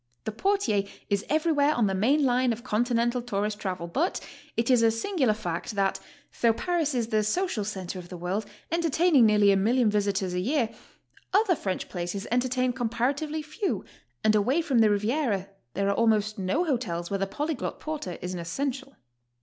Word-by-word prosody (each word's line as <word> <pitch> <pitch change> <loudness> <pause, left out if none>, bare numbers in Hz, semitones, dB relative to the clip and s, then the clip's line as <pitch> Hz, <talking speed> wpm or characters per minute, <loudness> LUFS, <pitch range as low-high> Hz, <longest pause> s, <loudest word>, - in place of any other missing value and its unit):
The 220 - -3
portier 225 - +1 0.3
is 200 0 +1
every 315 +2 +2
where 290 0 +3
on 235 - +2
the 195 - 0
main 270 +10 +3
line 250 0 +3
of 230 +1 -4
Continental 240 +1 +1
tourist 210 -2 -2
travel, 185 -4 -3
but 280 - -1 0.4
it 230 +3 +2
is 245 -2 +5
a 230 - +5
singular 245 - +1
fact 205 +1 -4
that, 195 -1 +1 0.4
though 230 -1 +5
Paris 325 0 -1
is 230 -2 -1
the 215 -1 +2
social 225 - 0
centre 190 -3 -5
of 175 -1 -11
the 180 - -7
world, 185 +5 -2 0.2
entertaining 330 -5 +4
nearly 210 -1 +5
a - - +4
million 225 +3 +3
visitors 200 -3 0
a 180 - 0
year, 235 +3 0 0.6
other 400 -3 +4
French 190 -9 -3
places 175 +2 -4
entertain 250 +1 +1
comparatively 270 +6 -1
few, 315 +7 -3 0.4
and 215 0 +4
away 230 +9 +2
from 265 -7 +2
the 220 -1 +6
Riviera 210 -1 0 0.3
there 200 +2 0
are 200 - +3
almost 215 -2 +2
no 190 - +1
hotels 200 - -2
where 195 - 0
the 195 - 0
polyglot 295 +6 -3
porter 300 - -5
is 180 +1 -3
an 180 - -4
essential. 270 +10 -4
230 Hz, 180 wpm, -27 LUFS, 200-275 Hz, 0.6 s, the